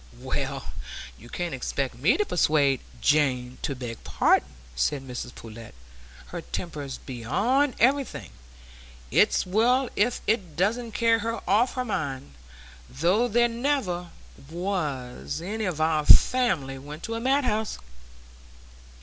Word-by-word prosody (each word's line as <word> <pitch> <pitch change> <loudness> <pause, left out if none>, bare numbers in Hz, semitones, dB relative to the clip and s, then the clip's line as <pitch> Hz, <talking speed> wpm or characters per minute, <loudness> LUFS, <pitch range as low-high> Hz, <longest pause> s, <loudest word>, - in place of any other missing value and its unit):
"Well, - - -4 0.4
you 120 - -15
can't 175 +2 -3
expect 130 +1 -2
me 135 - +2
to 420 - +1
persuade 145 - +2 0.2
Jane 130 - +2
to 140 - -2
beg 120 -3 -7
pardon," 70 - +2 0.3
said 130 - 0
Mrs 125 -1 -6
Pullet. 115 - -11 0.5
"Her 170 - -5
temper's 150 -6 -5
beyond 215 - 0
everything; 265 - +1 0.8
it's - - +4
well 240 +7 +2
if 230 +4 +1
it 195 -8 0
doesn't 225 +6 0
carry 230 0 +3
her 230 +2 -4
off 225 +8 +3
her 255 -1 -1
mind, 135 - -3 0.6
though 180 - +2
there 240 +1 +3
never 230 -8 -1 0.4
was 150 - -3
any 210 +6 -3
of 175 -5 -2
our 155 -1 +2
family 170 - +5
went 150 +4 -9
to 225 - -3
a 230 - -2
madhouse." 250 -4 +1
175 Hz, 125 wpm, -26 LUFS, -, 0.8 s, family